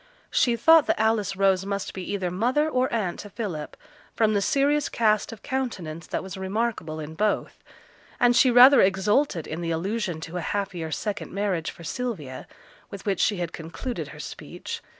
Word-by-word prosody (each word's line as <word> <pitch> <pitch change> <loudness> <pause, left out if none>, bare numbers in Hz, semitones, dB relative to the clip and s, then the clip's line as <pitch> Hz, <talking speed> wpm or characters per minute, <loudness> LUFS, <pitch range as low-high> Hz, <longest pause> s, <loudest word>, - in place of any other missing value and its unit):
She 240 -2 +3
thought 320 +6 +6
that - - +1
Alice 215 -3 +1
Rose 195 -1 +3
must 200 0 -3
be 190 - -6
either 190 -3 -2
mother 250 - +1
or 255 -4 0
aunt 205 -7 -1
to 205 - -8
Philip, 185 -9 -5 0.4
from 220 -1 +3
the 200 - +2
serious 285 +6 +2
cast 215 -2 +1
of 225 - -11
countenance 190 - -4
that - - -3
was 190 -1 -7
remarkable 190 -5 -2
in 155 0 -6
both; 210 +5 -1 0.6
and 245 0 +4
she 255 - +6
rather 250 +3 +8
exulted 190 - +2
in 160 +2 -5
the 170 - -2
allusion 180 +1 -2
to 165 +2 -6
a - - -2
happier 180 -3 -3
second 205 +6 -4
marriage 195 -5 -1
for 170 - -11
Sylvia, 165 - -5 0.4
with 200 - -9
which 195 -3 0
she 205 - +2
had 175 -2 -3
concluded 170 +10 -5
her - - -11
speech. - - -7
200 Hz, 180 wpm, -25 LUFS, 175-235 Hz, 0.6 s, rather